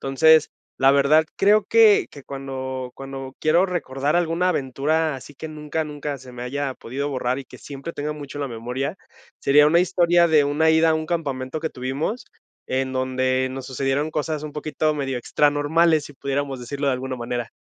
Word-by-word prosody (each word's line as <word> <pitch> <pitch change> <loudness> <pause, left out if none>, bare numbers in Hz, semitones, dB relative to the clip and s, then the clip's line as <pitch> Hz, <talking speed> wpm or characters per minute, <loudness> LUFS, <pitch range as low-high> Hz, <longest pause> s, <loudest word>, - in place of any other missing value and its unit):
Entonces 155 +3 +4 0.3
la 135 +1 +5
verdad, 140 +3 +4
creo 205 +1 +4
que 220 -1 +5
que 140 -2 -13
cuando 130 -2 -5
cuando 135 -1 -8
quiero 170 +4 +3
recordar 150 -5 -1
alguna 175 +1 +1
aventura, 155 +1 0
así 135 +2 -10
que 160 - -6
nunca 155 +1 -4
nunca 145 -1 -5
se 130 0 -13
me 120 0 -7
haya 135 +2 -3
podido 135 +5 -4
borrar 130 -2 -1
y 140 - -7
que - - -14
siempre 140 +4 -8
tenga 150 0 -3
mucho 145 -1 -8
la 140 - -2
memoria, 125 +7 -4 0.4
sería 145 +2 +5
una 170 +3 +4
historia 175 -1 +3
de 155 -2 +4
una 145 +3 +2
ida 160 0 +4
a - - +3
un 155 0 -2
campamento 145 -4 -3
que 160 0 -2
tuvimos 135 - -3 0.5
en 130 0 -1
donde 130 0 0
nos 130 0 -6
sucedieron 135 +3 -1
cosas 155 0 -2
un 150 -1 -6
poquito 155 +1 -1
medio 135 -3 -2
extranormales, 145 +4 +2
si - - -10
pudiéramos 140 -1 -3
decirlo 140 +4 -4
de - - +3
alguna 130 0 -4
manera. 120 -1 -4
145 Hz, 185 wpm, -23 LUFS, 130-155 Hz, 0.5 s, la